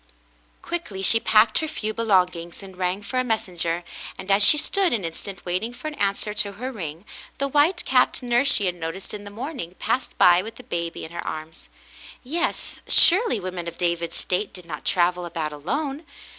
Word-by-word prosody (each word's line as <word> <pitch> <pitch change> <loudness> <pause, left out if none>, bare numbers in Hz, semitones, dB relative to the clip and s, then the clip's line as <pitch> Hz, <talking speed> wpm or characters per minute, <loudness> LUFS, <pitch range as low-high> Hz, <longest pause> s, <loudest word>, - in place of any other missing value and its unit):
Quickly 265 - -4
she 225 +4 +5
packed 220 0 +4
her 315 - -1
few 215 -7 -3
belongings 180 -5 0
and 190 -1 -11
rang 185 +2 -2
for 255 - -4
a - - +2
messenger, 175 -7 -2 0.3
and 195 - -4
as 195 +1 +5
she 300 - +9
stood 375 +2 +2
an 210 -7 -1
instant 175 +3 -7
waiting 185 +7 -2
for 310 - -7
an - - -9
an 200 -7 +1
swer 210 +1 -5
to 205 -1 0
her 250 +6 -5
ring, 170 - -7 0.3
the 275 - 0
white 300 +6 +2
capped 255 -1 +3
nurse 245 +3 +3
she 200 - +4
had 180 - +1
noticed 175 +2 -6
in 205 -1 -7
the - - -7
morning 225 - -6
passed 245 +3 -2
by 175 0 +6
with 225 +3 -8
the 250 - -12
baby 170 -7 -4
in 160 - -10
her 170 - -5
arms. 155 +1 -7 0.5
Yes, 335 +7 -2
surely 370 - +5
women 180 -2 -5
of 170 - -6
David's 170 -1 -1
state 190 +2 -2
did 180 -2 -10
not 150 -3 -7
travel 180 0 +2
about 160 -3 -4
alone. 275 - -3
200 Hz, 200 wpm, -24 LUFS, 175-250 Hz, 0.5 s, she